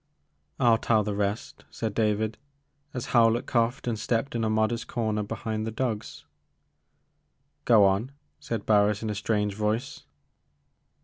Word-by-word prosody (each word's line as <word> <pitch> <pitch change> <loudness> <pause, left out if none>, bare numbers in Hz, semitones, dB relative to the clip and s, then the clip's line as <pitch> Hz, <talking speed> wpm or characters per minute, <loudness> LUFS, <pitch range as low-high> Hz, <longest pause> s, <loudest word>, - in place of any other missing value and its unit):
I 130 - +1
'11 115 -1 +4
tell 110 -2 +3
the 105 0 -2
rest, 100 +2 -3
said 110 -3 -4
David, 110 0 0 0.5
as 125 -2 -4
Howlett 115 0 +4
coughed 120 +1 0
and 115 -3 -1
stepped 115 +4 -1
in 115 -1 -1
a 110 - +1
modest 110 +2 0
comer 110 -3 -1
behind 110 +1 -4
the 110 - -2
dogs. 110 -2 -4 1.4
Go 110 -4 +6
on,*' 100 +7 +1 0.3
said 115 -3 -4
Barris 105 0 +3
in 110 - -2
a - - -2
strange 105 -1 0
voice. 110 +5 -2
110 Hz, 145 wpm, -27 LUFS, 105-115 Hz, 1.4 s, Go